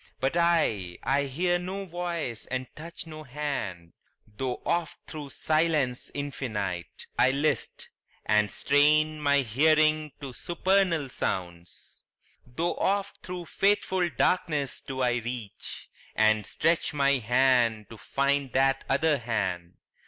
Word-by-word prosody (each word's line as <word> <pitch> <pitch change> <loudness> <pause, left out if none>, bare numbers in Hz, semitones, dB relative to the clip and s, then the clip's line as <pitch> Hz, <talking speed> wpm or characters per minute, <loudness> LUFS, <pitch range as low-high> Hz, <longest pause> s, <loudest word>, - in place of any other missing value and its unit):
But 135 +4 0
I 160 - +2
I 140 +1 +2
hear 175 +6 0
no 190 +2 -4
voice 170 - -3
and 130 0 -3
touch 165 +3 -8
no 155 -1 -8
hand, 125 - -4 0.3
Tho' 125 +4 -4
oft 170 0 -1
thro' 150 -3 -7
silence 155 -4 0
infinite 105 - -4
I 130 - +6
list, 140 -1 -1 0.4
And 105 -1 +3
strain 155 +4 +3
my 140 -1 +4
hearing 155 +5 +3
to 135 -3 -7
supernal 175 -1 +1
sounds; 85 -7 -4 0.4
Tho' 165 +8 -1
oft 200 0 0
thro' 180 -1 -6
fateful 190 -2 +1
darkness 160 -6 +1
do 130 -1 -5
I 120 -1 +2
reach, 120 -3 -6 0.3
And 110 -1 +3
stretch 165 +1 +1
my 140 -1 +3
hand 120 -2 +3
to 115 - -9
find 140 +1 0
that 135 0 +2
other 150 +1 +2
hand. 95 -7 -2
140 Hz, 125 wpm, -27 LUFS, 120-160 Hz, 0.4 s, I